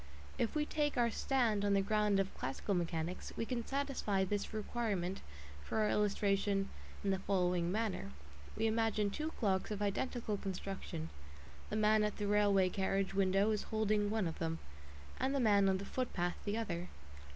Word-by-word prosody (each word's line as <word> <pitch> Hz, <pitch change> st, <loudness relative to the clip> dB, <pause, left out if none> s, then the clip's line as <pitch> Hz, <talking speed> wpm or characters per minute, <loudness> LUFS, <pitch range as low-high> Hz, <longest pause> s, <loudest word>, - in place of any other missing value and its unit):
If 230 Hz, -, 0 dB
we 300 Hz, -1 st, +2 dB
take 295 Hz, -2 st, 0 dB
our 235 Hz, -1 st, +3 dB
stand 230 Hz, -7 st, +1 dB
on 200 Hz, -1 st, +3 dB
the 195 Hz, -, +4 dB
ground 210 Hz, 0 st, +2 dB
of 195 Hz, 0 st, 0 dB
classical 135 Hz, +10 st, -2 dB
mechanics, 170 Hz, -1 st, -2 dB
we 230 Hz, -, -1 dB
can 240 Hz, -1 st, -2 dB
satisfy 270 Hz, -8 st, 0 dB
this 200 Hz, +1 st, -2 dB
requirement 210 Hz, -4 st, -2 dB, 0.4 s
for -, -, -3 dB
our 215 Hz, -1 st, +3 dB
illustration 200 Hz, -1 st, +1 dB, 0.3 s
in 200 Hz, -, +2 dB
the 190 Hz, -, +1 dB
following 180 Hz, -3 st, +1 dB
manner. 215 Hz, -, -1 dB, 0.5 s
We 220 Hz, -, +1 dB
imagine 220 Hz, -2 st, +2 dB
two 310 Hz, +8 st, -2 dB
clocks 190 Hz, -5 st, 0 dB
of 210 Hz, -2 st, -3 dB
identical 210 Hz, +1 st, -1 dB
construction; 190 Hz, -4 st, -5 dB, 0.6 s
the -, -, -2 dB
man 215 Hz, 0 st, +4 dB
at 210 Hz, -1 st, -1 dB
the 210 Hz, -, -2 dB
railway 200 Hz, -2 st, +4 dB
carriage 195 Hz, 0 st, 0 dB
window 195 Hz, +2 st, +3 dB
is 210 Hz, -, 0 dB
holding 215 Hz, -1 st, +1 dB
one 215 Hz, -2 st, +1 dB
of 160 Hz, -, -5 dB
them, 165 Hz, -1 st, -1 dB, 0.6 s
and 270 Hz, +2 st, +1 dB
the -, -, +2 dB
man 205 Hz, -5 st, +5 dB
on 190 Hz, -, +2 dB
the 200 Hz, -, -6 dB
footpath 195 Hz, -8 st, -2 dB
the 205 Hz, +1 st, 0 dB
other. 180 Hz, -6 st, -3 dB
205 Hz, 175 wpm, -36 LUFS, 190-220 Hz, 0.6 s, man